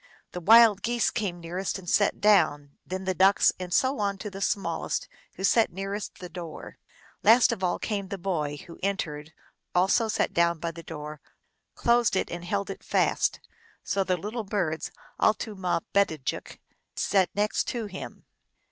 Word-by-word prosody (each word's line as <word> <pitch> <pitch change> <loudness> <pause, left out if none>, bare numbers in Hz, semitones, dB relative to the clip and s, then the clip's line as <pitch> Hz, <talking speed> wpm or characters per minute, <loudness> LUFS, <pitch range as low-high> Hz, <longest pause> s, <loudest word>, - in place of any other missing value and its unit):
The 180 - -6
Wild 220 +1 +7
Geese 240 +1 +1
came 195 -6 -3
nearest 180 +4 -3
and 185 -2 -12
sat 205 +3 +2
down, 155 -9 +3
then 190 +1 -5
the 190 0 0
Ducks, 190 +2 +4
and 180 -1 -6
so 260 +8 +2
on 200 -1 0
to 210 +1 -6
the 195 0 -8
small 200 0 -1
est, - - -2 0.3
who - - -7
sat 225 +3 +4
nearest 195 +2 -5
the 180 - -8
door. 170 -2 -9 0.4
Last 240 +2 +6
of 210 -5 -4
all 180 - +1
came 200 -3 -3
the 200 - -5
boy, 160 -6 -2
who 170 - -12
entering 165 -6 -2 0.5
also 195 +5 +3
sat 220 0 0
down 170 0 +2
by 165 +1 -3
the 165 0 -10
door, 150 -2 -8 0.5
closed 235 -2 +3
it, - - -1
and 175 0 -5
held 200 +2 -2
it - - -9
fast. - - +1 0.4
So 195 - 0
the 185 -1 0
little 215 +6 -4
birds, 185 -6 -2 0.3
altumabedajik 190 - 0
(M.), - - -21 0.4
sat 190 -3 +2
next 210 +1 +1
to 235 -3 -3
him. 190 -2 -9
190 Hz, 170 wpm, -27 LUFS, 175-210 Hz, 0.5 s, Wild